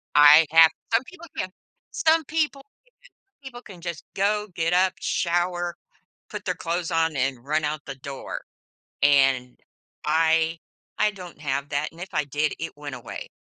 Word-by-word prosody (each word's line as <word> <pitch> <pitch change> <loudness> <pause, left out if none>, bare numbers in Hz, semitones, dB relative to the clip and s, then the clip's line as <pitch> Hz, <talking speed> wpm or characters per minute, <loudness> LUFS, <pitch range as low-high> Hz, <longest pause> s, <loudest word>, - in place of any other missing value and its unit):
I 150 +2 +9
have 165 0 +8 0.2
some 230 +3 +4
people 340 +4 -13
can, 185 - -2 0.4
some 320 0 +3
people 300 -2 -1
can 275 - -25 0.7
some - - -81
people 245 -2 -9
can 185 -4 -12
just 170 -1 -6
go, 210 +2 +1
get 165 0 0
up, 185 +1 +4
shower, 175 0 0 0.5
put - - -6
their - - -1
clothes 170 +1 -3
on, 165 -2 +1
and 130 -2 -1
run 155 +2 0
out 150 +1 -2
the 135 -2 -6
door, 135 0 -7 0.6
and 135 -3 +3 0.5
I 160 +1 +2 0.4
I 210 - +3
don't 180 -6 -11
have 140 -1 -2
that, 145 0 -1
and 165 +2 -13
if 190 - -6
I 150 -1 +1
did, 145 +2 -1
it 165 - -4
went 145 -3 -6
away. 120 -1 -8
165 Hz, 170 wpm, -25 LUFS, 145-185 Hz, 0.7 s, I